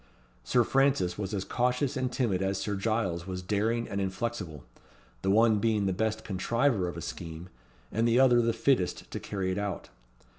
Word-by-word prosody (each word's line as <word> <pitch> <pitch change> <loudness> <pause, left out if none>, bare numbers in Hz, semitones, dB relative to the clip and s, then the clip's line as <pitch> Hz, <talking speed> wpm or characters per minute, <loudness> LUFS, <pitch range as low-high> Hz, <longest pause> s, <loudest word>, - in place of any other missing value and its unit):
Sir 120 - +3
Francis 135 -9 +2
was 95 -2 -3
as 100 -3 -2
cautious 125 +6 0
and 130 -2 -1
timid 115 -8 0
as 95 0 0
Sir 100 +1 -2
Giles 95 -5 -1
was 90 -1 -4
daring 110 +5 0
and 100 0 -2
inflexible: 95 - -3 0.6
the 95 - 0
one 110 +1 +5
being 110 -2 +1
the 95 - +1
best 110 +3 -1
contriver 105 +1 +1
of 85 - -5
a - - -5
scheme, 85 +1 -7 0.4
and 115 +2 +1
the 120 +2 +4
other 125 -2 +6
the 115 0 +2
fittest 115 -5 0
to - - -4
carry 95 -2 -3
it 95 - -2
out. 100 -5 -4
105 Hz, 185 wpm, -29 LUFS, 95-120 Hz, 0.6 s, other